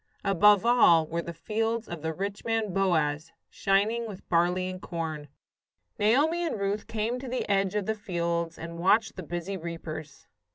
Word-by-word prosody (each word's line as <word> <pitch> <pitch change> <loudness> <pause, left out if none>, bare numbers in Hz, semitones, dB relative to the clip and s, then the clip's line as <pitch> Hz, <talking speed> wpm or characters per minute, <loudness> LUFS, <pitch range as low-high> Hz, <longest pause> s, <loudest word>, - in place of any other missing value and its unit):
Above 205 +1 +5
all 175 -10 +6
were 165 +2 -3
the 170 - -6
fields 225 +6 -2
of 170 -3 -6
the 160 +1 -2
rich 195 +5 -4
man, 225 -4 -1
Boaz, 165 -5 +1 0.2
shining 215 +4 +1
with 200 -3 -10
barley 180 +2 +2
and 185 0 -6
corn. 160 -3 -4 0.7
Naomi 290 +11 +3
and 315 -11 -2
Ruth 200 +1 -2
came 225 +3 -2
to 265 - -7
the 250 +1 -2
edge 195 -1 +1
of 205 -2 0
the 220 - 0
fields 170 -5 -2
and 170 0 -7
watched 205 +6 +3
the 185 - -6
busy 175 +3 -4
reapers. 160 -3 -7
195 Hz, 170 wpm, -28 LUFS, 170-215 Hz, 0.7 s, all